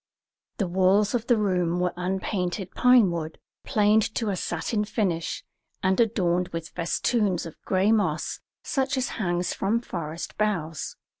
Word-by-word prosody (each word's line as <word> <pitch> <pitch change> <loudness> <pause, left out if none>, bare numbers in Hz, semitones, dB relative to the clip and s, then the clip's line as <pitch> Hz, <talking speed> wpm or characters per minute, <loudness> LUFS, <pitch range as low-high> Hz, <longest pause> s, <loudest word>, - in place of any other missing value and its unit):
The 200 - 0
walls 190 +3 +3
of 235 -1 -1
the 240 - +4
room 180 -4 +1
were 180 0 +2
of - - -27
unpainted 185 +1 -2
pinewood, 185 -11 +3 0.3
planed 210 +1 +3
to 225 -3 0
a - - -1
satin 185 +5 -1
finish, 185 -6 -2 0.4
and 190 +3 +2
adorned 180 -6 +2
with 165 -1 -6
festoons 185 +2 0
of 165 - -10
gray 190 +3 +2
moss 215 -2 0 0.2
such 270 0 0
as 260 - 0
hangs 175 -4 -1
from 210 +4 0
forest 170 -6 -6
boughs. 170 -8 -1
190 Hz, 145 wpm, -26 LUFS, 175-215 Hz, 0.4 s, the